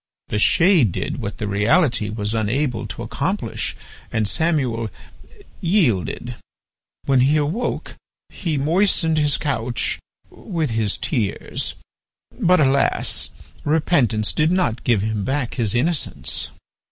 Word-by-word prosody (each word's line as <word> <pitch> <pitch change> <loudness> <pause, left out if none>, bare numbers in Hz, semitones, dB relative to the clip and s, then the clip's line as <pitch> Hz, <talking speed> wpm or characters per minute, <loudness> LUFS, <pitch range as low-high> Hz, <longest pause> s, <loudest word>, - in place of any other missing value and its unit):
The 105 - 0
shade 165 - +4
did - - -3
what 100 - -4
the 105 - -3
reality 115 - +2
was 105 0 -2
unable 115 +2 0
to - - -6
accomplish, - - -2 0.4
and 110 -2 0
Samuel 130 -7 0 0.7
yielded. 155 - +1 0.7
When 135 -2 +3
he 140 +5 +4
awoke 155 +12 -2 0.5
be 160 -5 0
moistened 160 +1 +2
his 145 -2 +2
couch 120 -5 -1 0.3
with 165 - -3
his 110 -3 0
tears, 115 -10 -2 0.6
but 180 +1 +4
alas! 140 -1 +1 0.3
repentance 145 -9 +2
did 155 +1 +2
not 180 -11 0
give 110 -5 +2
him 110 -2 -1
back 135 +1 -1
his 115 -2 0
innocence." 155 +5 -1
135 Hz, 115 wpm, -21 LUFS, 110-160 Hz, 0.7 s, shade